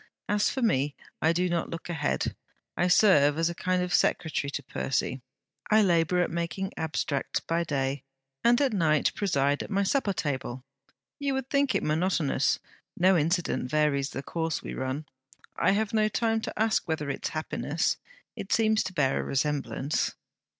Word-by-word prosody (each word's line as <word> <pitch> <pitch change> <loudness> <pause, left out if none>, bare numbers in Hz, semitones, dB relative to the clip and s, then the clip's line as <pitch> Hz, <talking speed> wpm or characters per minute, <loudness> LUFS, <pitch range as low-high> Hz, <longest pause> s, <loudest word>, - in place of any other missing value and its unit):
As 210 0 +2
for 265 - -2
me, 145 - +1 0.3
I 160 - +4
do 180 +2 +1
not 170 -1 -1
look 165 - -6
ahead. 155 -4 -1 0.4
I 175 - +2
serve 155 -6 +5
as 165 +1 +1
a - - -5
kind 180 +1 0
of 180 0 -3
secretary 155 -4 +1
to - - -4
Percy. 130 0 -2 0.5
I 215 0 +5
labour 175 -1 +3
at - - -3
making 170 +3 -3
abstracts 155 -3 -2
by 165 +1 -1
day, 140 -3 -1 0.4
and 240 +1 +5
at 270 -5 +2
night 155 -6 +2
preside 145 -7 +1
at - - -6
my 200 -1 +1
suppertable. 150 - -1 0.6
You 280 -1 0
would 265 0 -4
think 280 -2 +2
it - - +1
monotonous; 155 -3 +1 0.4
no 185 +2 +5
incident 165 -4 0
varies 140 -2 +1
the 135 - -6
course 165 0 -2
we - - -5
run. 130 +4 -3 0.5
I - - +3
have 215 +1 0
no 215 -1 +3
time 225 0 0
to - - -6
ask 220 -3 +1
whether 160 -3 -2
it - - -6
is - - -4
happiness. 155 0 -1 0.4
It 195 - -7
seems 220 -1 +3
to 185 - -5
bear 140 -6 +1
a - - -1
resemblance.' 140 -1 -1
165 Hz, 170 wpm, -28 LUFS, 145-200 Hz, 0.6 s, serve